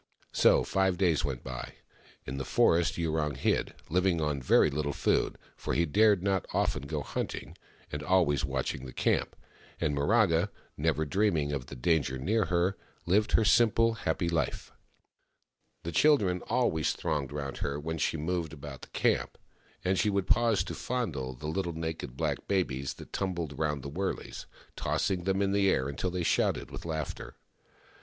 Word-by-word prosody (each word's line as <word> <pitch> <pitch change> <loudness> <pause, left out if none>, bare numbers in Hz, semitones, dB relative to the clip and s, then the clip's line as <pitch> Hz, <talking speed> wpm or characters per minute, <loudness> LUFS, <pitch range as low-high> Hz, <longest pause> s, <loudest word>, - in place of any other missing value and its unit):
So - - +5
five 95 -2 +1
days 85 -5 +2
went 65 -4 -3
by. 65 -1 -6 0.5
In 65 +2 -5
the - - -2
forest 85 +6 +3
Yurong 80 -3 0
hid, - - 0 0.2
L 90 +2 +3
/ing 90 -3 +2
on 75 -3 -1
very 70 +3 +4
Httle 70 0 -2
food - - +1
— - - -30
for - - -3
he 85 - +3
dared 105 +3 +4
not 95 -2 0
often 70 - 0
go 75 -1 -3
hunting - - -4 0.2
— - - -28
and 75 - -4
always 85 -7 +2
watching 65 -1 -2
the 65 - -9
camp; - - 0 0.4
and 75 - 0
Miraga, 85 +2 +3 0.3
never 80 +1 0
dreaming 80 -4 +1
of 65 -4 -3
the - - -8
danger 70 0 +1
near 105 - +1
her, 90 +2 +1 0.3
lived 105 +5 +2
her 110 - +4
simple, 115 0 +4
happy 95 -5 -1
life. 85 -1 -1 1.1
The 85 - -4
children 100 - +3
always 80 -11 +1
thronged 70 -3 -2
round 70 -2 -4
her 70 +1 -2
when 80 +2 -4
she 80 - 0
moved 80 0 -2
about 70 -3 -9
the - - -10
camp, - - 0 0.5
and 95 0 +2
she 105 - +2
would 100 -2 0
pause 115 -1 +3
to - - -6
fondle 75 - -3
the 65 - -10
little 85 +2 -2
naked 80 -5 -5
black - - -2
babies 70 -9 -1
that - - -13
tumbled 85 -7 -3
round 75 -4 -1
the - - -5
wurleys, 95 +5 -4 0.3
tossing 90 -3 -1
them 95 +1 +1
in 100 - +1
the 100 -1 +3
air 65 -7 +1
until 70 +6 -2
they 90 0 -2
shouted - - +1
with - - -8
laughter. 80 -3 -4
80 Hz, 175 wpm, -30 LUFS, 70-95 Hz, 1.1 s, So